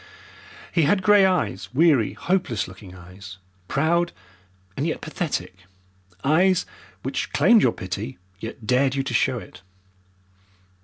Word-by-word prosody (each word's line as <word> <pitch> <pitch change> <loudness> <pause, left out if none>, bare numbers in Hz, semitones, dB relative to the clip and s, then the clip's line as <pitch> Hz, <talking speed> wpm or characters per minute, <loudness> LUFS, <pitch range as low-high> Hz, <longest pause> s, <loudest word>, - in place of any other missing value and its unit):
He 170 - +2
had 185 +6 +2
grey 205 0 +6
eyes, 100 - -1
weary, 145 -8 +4
hopeless 175 - -1
looking 95 0 -12
eyes, 95 +2 -12 0.3
proud 170 - +1 0.6
and 145 - -1
yet 160 - -2
pathetic, 145 - -4 0.7
eyes 180 +5 +3 0.4
which - - -3
claimed 235 -3 +5
your - - +4
pity 100 +8 -6 0.2
and 90 - -24
yet 110 0 -7
dared 130 +3 +2
you 135 - 0
to - - -4
show - - +2
it. - - -11
135 Hz, 135 wpm, -23 LUFS, -, 0.7 s, grey